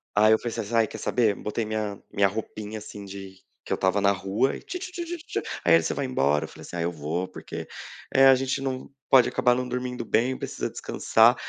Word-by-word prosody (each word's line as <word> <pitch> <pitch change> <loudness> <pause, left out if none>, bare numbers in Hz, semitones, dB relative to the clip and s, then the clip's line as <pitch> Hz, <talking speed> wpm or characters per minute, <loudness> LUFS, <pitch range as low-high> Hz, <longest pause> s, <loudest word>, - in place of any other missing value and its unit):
Aí 105 +1 +6
eu 110 - +6
falei 120 -2 -4
assim: 115 +1 -3
“Ai, 115 -2 +4
quer - - -8
saber?”. 110 -5 +2
Botei 110 +2 -3
minha 105 -2 -3
minha 100 0 +4
roupinha, 105 +1 -5
assim, 105 -1 -9
de 95 -1 -9 0.3
que - - -9
eu - - +3
estava 95 +2 +1
na 100 0 +5
rua 100 +7 0
e - - -11
tchutchutchu, 350 -2 -5 0.2
aí 85 - +6
ele: 85 - +4
“Você - - -1
vai 140 - -2
embora?”. 75 - +1
Eu - - -9
falei - - -13
assim: - - -9
“Ah, 85 - -2
eu 85 +1 0
vou, 85 +3 -3
porque, 95 - -7 0.5
eh, 135 0 +7
a 135 - +8
gente 135 +1 -1
não 130 -1 -3 0.2
pode 130 -2 +7
acabar 125 -1 +3
não 125 0 -2
dormindo 125 -1 -3
bem, 125 +4 +1
precisa - - -4
descansar”. 115 +3 +3
110 Hz, 225 wpm, -26 LUFS, 100-130 Hz, 0.5 s, a